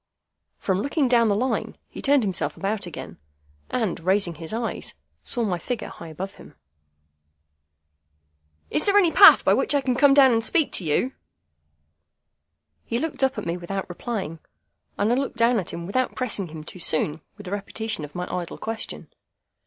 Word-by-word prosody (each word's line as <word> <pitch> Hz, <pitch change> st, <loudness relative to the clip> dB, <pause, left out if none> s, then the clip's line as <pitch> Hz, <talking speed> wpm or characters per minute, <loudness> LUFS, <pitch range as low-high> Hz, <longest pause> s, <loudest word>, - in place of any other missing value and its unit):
From 190 Hz, 0 st, -1 dB
looking 280 Hz, +2 st, +1 dB
down 235 Hz, -2 st, +4 dB
the 205 Hz, -, +2 dB
Line, 255 Hz, +5 st, -1 dB
he -, -, -9 dB
turned 280 Hz, -2 st, +3 dB
himself 190 Hz, -3 st, -2 dB
about 200 Hz, -1 st, -2 dB
again, 165 Hz, -, -9 dB, 0.5 s
and, 220 Hz, -8 st, -1 dB
raising 185 Hz, +1 st, +1 dB
his 160 Hz, 0 st, -8 dB
eyes, 230 Hz, +1 st, -3 dB, 0.3 s
saw 240 Hz, -, -1 dB
my 185 Hz, -5 st, -1 dB
figure 240 Hz, +4 st, -4 dB
high 170 Hz, -, -10 dB
above 185 Hz, +5 st, -6 dB
him. -, -, -15 dB, 2.2 s
"Is -, -, +2 dB
there 400 Hz, 0 st, +5 dB
any 360 Hz, -5 st, +5 dB
path -, -, +8 dB
by -, -, +5 dB
which 360 Hz, -, +1 dB
I 285 Hz, -, +3 dB
can 260 Hz, -2 st, 0 dB
come 275 Hz, +2 st, +5 dB
down 270 Hz, -2 st, +7 dB
and 225 Hz, -1 st, +2 dB
speak 310 Hz, +6 st, +3 dB
to -, -, +1 dB
you?" 170 Hz, -, 0 dB, 1.7 s
He 235 Hz, -, -2 dB
looked 295 Hz, +1 st, -2 dB
up 265 Hz, 0 st, +2 dB
at -, -, -4 dB
me 170 Hz, +1 st, -2 dB
without 190 Hz, +2 st, -4 dB
replying, 185 Hz, -3 st, -5 dB, 0.6 s
and 210 Hz, +3 st, +1 dB
I -, -, +4 dB
looked 270 Hz, -2 st, -2 dB
down 235 Hz, 0 st, +3 dB
at 185 Hz, -, -5 dB
him 170 Hz, -, -6 dB
without 255 Hz, +8 st, -1 dB
pressing 210 Hz, -7 st, -2 dB
him 155 Hz, -1 st, -9 dB
too 180 Hz, -, -9 dB
soon 155 Hz, -1 st, 0 dB, 0.2 s
with 205 Hz, -3 st, -11 dB
a -, -, -6 dB
repetition 215 Hz, -2 st, -3 dB
of 150 Hz, 0 st, -9 dB
my 180 Hz, 0 st, -3 dB
idle 175 Hz, -2 st, -5 dB
question. 225 Hz, 0 st, -5 dB
215 Hz, 180 wpm, -24 LUFS, 180-255 Hz, 2.2 s, path